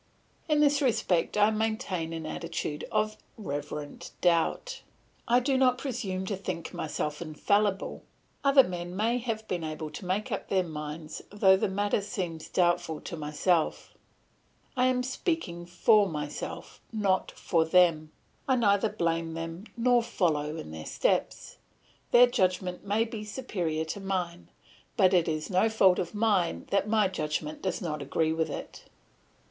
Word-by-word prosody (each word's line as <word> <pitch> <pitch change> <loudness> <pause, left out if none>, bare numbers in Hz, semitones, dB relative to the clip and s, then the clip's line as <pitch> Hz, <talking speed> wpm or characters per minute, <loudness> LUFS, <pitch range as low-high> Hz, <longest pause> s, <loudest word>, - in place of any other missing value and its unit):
In 300 -1 +4
this 290 0 +4
respect 210 -9 +1
I 210 +1 +5
maintain 215 -6 -2
an 165 -1 -5
attitude 160 -2 -4
of 215 0 0 0.2
reverent 145 -5 -5
doubt. 175 - +1 0.5
I 240 +1 +5
do 260 +1 +1
not 250 -1 +4
presume 215 -9 -3
to 200 - -2
think 180 -3 -5
myself 150 0 -3
infallible; 195 +5 0 0.4
other 275 -1 +7
men 175 -3 -5
may 230 +5 +1
have 225 -2 -4
been 175 -2 -2
able 155 0 -5
to 165 - -8
make 195 +3 -1
up - - -3
their 190 -2 +2
minds 155 -1 -6
though 195 -2 +5
the 190 - 0
matter 205 +1 0
seems 180 -6 -5
doubtful 175 -3 +1
to 175 - -6
myself; 155 +2 0 0.8
I 255 0 +3
am 250 -1 +1
speaking 255 - -3
for 200 +3 +4
myself, 150 -2 -6
not 200 -4 +1
for 165 -2 +1
them; 160 -2 +3 0.4
I 260 - +4
neither 210 -3 +3
blame 165 -5 -1
them 165 +4 -6
nor 245 0 +4
follow 160 -10 0
in 75 - -7
their 80 0 -7
steps; - - -1 0.5
their 245 +1 +8
judgment 185 -5 0
may 205 +3 +1
be 225 -2 -6
superior 180 -9 -3
to 160 - -5
mine, 180 -3 -3 0.5
but 190 -3 +5
it 175 -3 +4
is 155 +3 -2
no 190 +5 +3
fault 190 -4 +4
of 175 +4 -3
mine 205 -6 +1
that 200 +1 +1
my 215 -2 +4
judgment 155 -4 -3
does 190 +1 -2
not 155 -3 -3
agree 160 +3 0
with 160 0 0
it. - - -7
185 Hz, 155 wpm, -29 LUFS, 165-220 Hz, 0.8 s, their